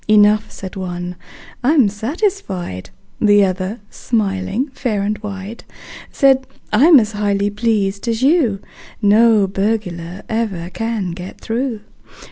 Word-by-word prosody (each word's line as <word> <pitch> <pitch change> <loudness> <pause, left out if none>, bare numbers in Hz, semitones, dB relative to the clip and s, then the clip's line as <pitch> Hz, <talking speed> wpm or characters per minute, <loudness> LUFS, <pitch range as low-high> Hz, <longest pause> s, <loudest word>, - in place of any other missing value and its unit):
"Enough," 210 0 +4
said 190 -1 -8
one: 180 -1 -5 0.5
"I'm 275 -3 +4
satisfied." 210 - -3 0.3
The 205 -2 +5
other, 190 +4 -3
smiling 205 +3 -1
fair 235 -6 -2
and 210 +1 0
wide, 205 +1 -7 0.5
Said: 270 -2 +3 0.3
"I'm 290 +7 +7
as 215 -2 -1
highly 205 -1 0
pleased 205 -1 -1
as 230 +1 -1
you: 270 - +3 0.4
No 215 0 +5
burglar 195 -3 -3
ever 200 -6 -2
can 225 -5 -2
get 180 +2 -8
through. 230 -1 -3
210 Hz, 115 wpm, -18 LUFS, 195-230 Hz, 0.5 s, I'm